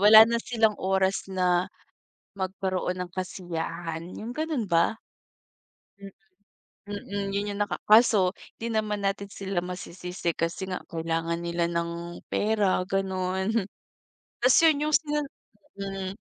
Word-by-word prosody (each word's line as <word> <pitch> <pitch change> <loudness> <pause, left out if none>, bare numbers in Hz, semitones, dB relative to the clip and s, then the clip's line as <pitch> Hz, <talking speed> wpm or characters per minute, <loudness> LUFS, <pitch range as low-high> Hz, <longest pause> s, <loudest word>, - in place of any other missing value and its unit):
wala 215 +2 +10
na 235 0 +1
silang 220 -3 +2
oras 190 0 +1
na, 180 -1 +2 0.7
magkaroon 185 -1 -2
ng - - -7
kasiyahan, 170 -3 -4 0.2
yung 225 +2 -5
ganun 310 -7 -1
ba? 170 +5 +3 1.1
Mm, 195 -1 -9 0.9
mm, 200 0 -3
yun 205 +1 -1
yung 200 - -6
naka - - -4
kaso 215 -4 +6 0.3
di 230 - -2
naman 210 -2 0
natin 200 0 -2
sila 195 -2 -2
masisisi 180 -1 -4
kasi 165 +3 -2
nga, 185 - -1
kailangan 165 0 -1
nila 170 0 0
ng 170 0 -3
pera, 205 -3 +2
ganon. 190 0 0 0.9
Tas 250 +1 +6
yun 300 -1 +4
yung 305 - +4
sina 300 -1 -2 0.6
mm, 195 -1 -4
190 Hz, 125 wpm, -27 LUFS, 175-210 Hz, 1.1 s, wala